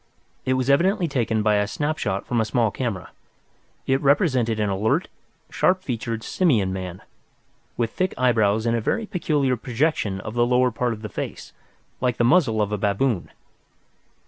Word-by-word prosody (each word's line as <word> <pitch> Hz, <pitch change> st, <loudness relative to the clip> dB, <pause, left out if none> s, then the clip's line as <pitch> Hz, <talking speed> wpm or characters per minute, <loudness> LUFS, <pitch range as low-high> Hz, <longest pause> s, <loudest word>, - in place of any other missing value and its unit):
It 130 Hz, -, +2 dB
was 130 Hz, -1 st, -1 dB
evidently 175 Hz, +6 st, +3 dB
taken 115 Hz, -6 st, 0 dB
by 105 Hz, -1 st, +3 dB
a 105 Hz, 0 st, +1 dB
snapshot 105 Hz, -7 st, -2 dB
from 120 Hz, -2 st, 0 dB
a -, -, 0 dB
small 115 Hz, 0 st, +1 dB
camera. 110 Hz, -8 st, -4 dB, 0.7 s
It 135 Hz, +1 st, +1 dB
represented 130 Hz, -, +2 dB
an 105 Hz, -, +1 dB
alert, 110 Hz, -, 0 dB, 0.4 s
sharp 185 Hz, 0 st, +2 dB
featured 115 Hz, -5 st, -3 dB
simian 115 Hz, -, +1 dB
man, 90 Hz, -1 st, -6 dB, 0.7 s
with 115 Hz, -2 st, 0 dB
thick 185 Hz, 0 st, -1 dB
eyebrows 110 Hz, -3 st, +2 dB
and 115 Hz, 0 st, +2 dB
a 115 Hz, -, 0 dB
very 225 Hz, -, -1 dB
peculiar 155 Hz, -10 st, 0 dB
projection 120 Hz, -5 st, -1 dB
of 110 Hz, -, -6 dB
the 120 Hz, 0 st, +2 dB
lower 125 Hz, +1 st, +3 dB
part 120 Hz, +1 st, -1 dB
of 110 Hz, 0 st, -10 dB
the 110 Hz, -, -5 dB
face, -, -, -6 dB, 0.5 s
like 125 Hz, -2 st, 0 dB
the -, -, +2 dB
muzzle 120 Hz, -5 st, +3 dB
of 105 Hz, -, -4 dB
a 105 Hz, -, -2 dB
baboon. 100 Hz, 0 st, 0 dB
120 Hz, 170 wpm, -23 LUFS, 105-140 Hz, 0.7 s, evidently